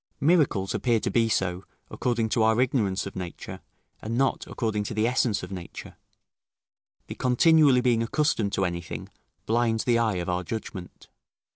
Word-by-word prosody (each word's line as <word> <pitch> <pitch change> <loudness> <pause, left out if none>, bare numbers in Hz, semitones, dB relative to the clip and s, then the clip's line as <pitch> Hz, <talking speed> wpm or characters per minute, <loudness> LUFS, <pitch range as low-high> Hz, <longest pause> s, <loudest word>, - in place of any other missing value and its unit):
Miracles 140 - +2
appear 120 -3 +1
to - - -2
be 115 -1 +2
so, 95 -3 -1 0.3
according 120 -2 -1
to 110 - 0
our 110 +1 +3
ignorance 110 -7 +1
of 100 - -8
nature, 90 -2 -7 0.4
and 115 +2 -3
not 135 0 0
according 110 -3 -2
to 100 - -5
the 110 +1 +1
essence 120 -4 +1
of 90 - -7
nature 90 -3 -8 1.1
the - - -7
continually 140 +1 +4
being 120 -2 +2
accustomed 115 -4 0
to 95 - 0
anything, 85 -1 -5 0.4
blinds 115 0 +1
the 120 -2 +2
eye 110 -4 +1
of 90 -1 -3
our 90 0 -1
judgment. 95 -2 -7
110 Hz, 160 wpm, -26 LUFS, 95-125 Hz, 1.1 s, continually